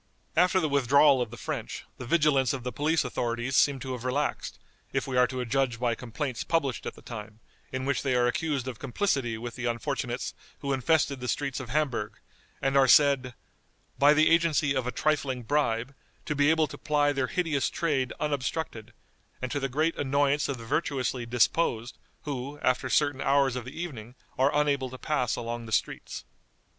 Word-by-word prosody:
After 180 +2 +4
the 160 - +1
withdrawal 140 0 +4
of 120 - -2
the 120 - -10
French, - - -5 0.2
the 125 - -6
vigilance 140 -5 +3
of 130 -3 -5
the 125 - -3
police 155 +2 +1
authorities 120 +1 -2
seems 135 -1 +3
to 130 - -5
have 125 -2 -5
relaxed, 140 +3 -2 0.3
if 135 - -1
we 135 - -4
are 125 0 +5
to 130 -1 -4
judge 125 -1 0
by 120 -1 +1
complaints 125 +2 -4
published 140 -7 -1
at - - -5
the - - -16
time, 110 -2 -8 0.3
in 130 0 -3
which 140 -3 0
they 130 -2 0
are 120 0 +3
accused 135 +1 -1
of 125 -3 -5
complicity 135 - -1
with 120 +1 -6
the 125 - -5
unfortunates 115 -2 -2 0.3
who 140 -1 -1
infested 140 0 +1
the 125 - -5
streets 140 +1 -1
of 130 -3 -7
Hamburg, 130 -8 -1 0.5
and 135 0 +1
are 135 -1 +6
said, 135 -3 +5 0.6
"by 145 +2 +6
the 155 +2 +4
agency 160 -4 +3
of 130 -2 -1
a - - -1
trifling 140 -5 0
bribe, 125 -2 0 0.3
to - - -1
be 145 0 +3
able 160 0 +4
to - - -10
ply 145 -1 +2
their 135 -2 0
hideous 160 -6 0
trade 140 -6 0
unobstructed, 135 -5 -3 0.5
and 130 -1 -4
to 145 - -1
the 135 0 -2
great 155 +5 +1
annoyance 145 +1 +1
of 135 - -2
the 115 - -9
virtuously 130 -3 -1
disposed, 120 0 +1 0.2
who, 140 0 -5
after 130 0 +1
certain 145 0 +2
hours 135 -2 +3
of 125 -2 -4
the 130 +5 -8
evening, 125 -9 -6 0.2
are 135 +2 +3
unable 140 -3 +1
to 130 - -9
pass 130 -4 0
along 120 0 -5
the - - -9
streets." - - -2
135 Hz, 190 wpm, -28 LUFS, 125-145 Hz, 0.6 s, are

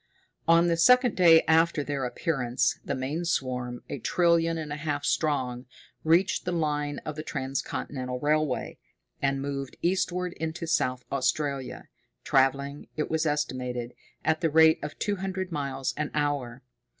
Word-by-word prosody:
On 165 +1 +6
the 170 -1 +2
second 250 +7 +5
day 165 -3 +7
after 160 -1 +3
their 140 -2 -2
appearance, 125 -2 0
the - - -2
main 140 +6 -3
swarm, 125 -6 -2
a - - -5
trillion 170 -1 +2
and 155 -2 -4
a - - -4
half 145 -2 -3
strong, 130 -5 0 0.4
reached 170 +4 +3
the 180 - -2
line 150 -3 -1
of 155 - -4
the 155 - -4
transcontinental 130 -2 -4
railway, 150 -1 0 0.4
and 135 0 0
moved 140 -2 -4
eastward 180 0 0
into 160 +1 -4
South 130 -6 0
Australia, 140 0 -1 0.4
traveling, 140 +2 +1
it 150 - -2
was 160 0 +1
estimated, 125 -5 -2 0.3
at 160 +1 +1
the 165 - +2
rate 160 +1 +6
of 150 0 -6
two 205 -1 -1
hundred 190 -1 -4
miles 135 -3 -2
an 150 0 -1
hour. 140 -4 -1
150 Hz, 150 wpm, -27 LUFS, 135-165 Hz, 0.4 s, day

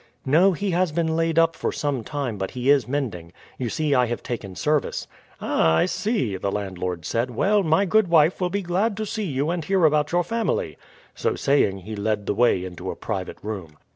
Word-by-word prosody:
"No; 170 +8 +5
he 200 +3 -2
has 175 -1 +1
been 160 0 0
laid 165 0 0
up 165 0 +4
for - - -2
some 140 -5 -2
time, 135 -8 -4
but 95 - -2
he 125 +2 +1
is 145 -3 +3
mending. 115 -12 -3 0.3
You 125 -3 -2
see 150 +4 0
I 125 -2 +3
have 120 - -4
taken 100 -6 -5
service." 150 +7 0 0.3
"Ah, 80 0 +2
I - - +3
see," 185 - -1
the 100 +1 -2
landlord 90 -4 -4
said. 115 +2 -1
"Well, 200 - +2
my 165 +3 +2
good 215 +1 +3
wife 165 +2 +4
will 180 - +1
be 200 +2 -2
glad 195 +5 0
to 215 - -2
see 215 0 -3
you 145 -1 -1
and 175 -2 -2
hear 190 +1 +2
about 150 -1 +2
your 175 0 +2
family." 230 +6 -1 0.4
So 460 -3 -1
saying 100 -9 +1
he 110 +4 -7
led 105 0 -1
the - - 0
way 105 -4 +2
into 90 -2 -7
a - - -4
private - - -4
room. 95 -8 -6
145 Hz, 215 wpm, -24 LUFS, 110-175 Hz, 0.4 s, No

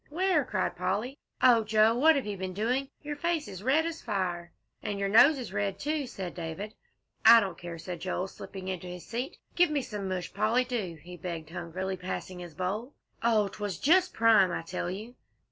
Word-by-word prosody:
"Where?" 355 -1 +2
cried 210 -7 -1
Polly. 200 +10 -2 0.2
"Oh, 240 -3 +7
Joe, 220 +1 +4
what 310 +6 +5
have 275 - -1
you 205 -1 -3
been 185 -1 -5
doing? 250 +6 0
Your 295 0 -4
face 335 +1 0
is 190 - -7
as - - -12
red 285 +6 +3
as 330 -1 -4
fire." 180 -5 -2 0.3
"And 205 - -3
your 200 0 -1
nose 280 +8 +7
is 250 -4 -6
red, 200 -1 -1
too," 295 +3 -2
said 185 -6 -6
David. 175 +5 -5 0.5
"I 230 +1 +10
don't 195 -3 -2
care," 170 -1 -7
said 175 +1 -6
Joel, 185 +1 -2
slipping 190 0 -9
into 185 -1 -4
his 180 0 -8
seat. 245 +3 -4 0.2
"Give 355 -1 +5
me 290 -3 0
some 205 -6 -5
mush, 185 -1 -3
Polly, 235 +4 +2
do!" 220 -10 -3
he 180 +1 -10
begged 165 -2 -6
hungrily, 185 +2 -4
passing 185 0 -5
his 175 -3 -9
bowl. 210 - -3 0.3
"Oh, 220 -3 +3
'twas 205 -3 -4
just 360 +5 +4
prime, 220 -5 +5
I 170 - -3
tell 175 +1 -3
you!" 215 +6 -6
205 Hz, 205 wpm, -29 LUFS, 185-255 Hz, 0.5 s, I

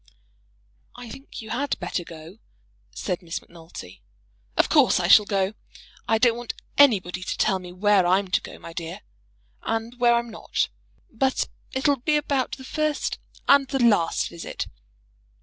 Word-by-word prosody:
"I 245 -2 -9
think 270 -4 -9
you 220 - -8
had 275 +4 -1
better 175 - -3
go," 165 +4 -11 0.5
said 175 - -3
Miss 165 -2 -4
Macnulty. 160 - -12 0.6
"Of - - +4
course, - - +5
I - - +1
shall 210 - +7
go. 195 0 0 0.5
I 225 - +3
don't 235 0 +4
want 240 -1 -5 0.2
anybody 190 -10 +4
to 185 - -3
tell 195 -3 +2
me 180 -1 -9
where 195 0 +3
I'm 190 +2 +2
to 180 - +2
go, - - -10
my 170 - -10
dear, 165 -1 -6 0.6
and 230 +2 -3
where 240 -1 +5
I'm 235 0 -1
not. 215 - -1 0.4
But 260 +3 +1 0.3
it'll 275 +2 +2
be 300 +5 +1
about 280 -4 -1
the 265 - -11
first 305 +2 -1 0.3
and 280 -1 +6
the 270 - -1
last 215 -10 +3
visit. 170 - -5
220 Hz, 160 wpm, -25 LUFS, 180-255 Hz, 0.6 s, shall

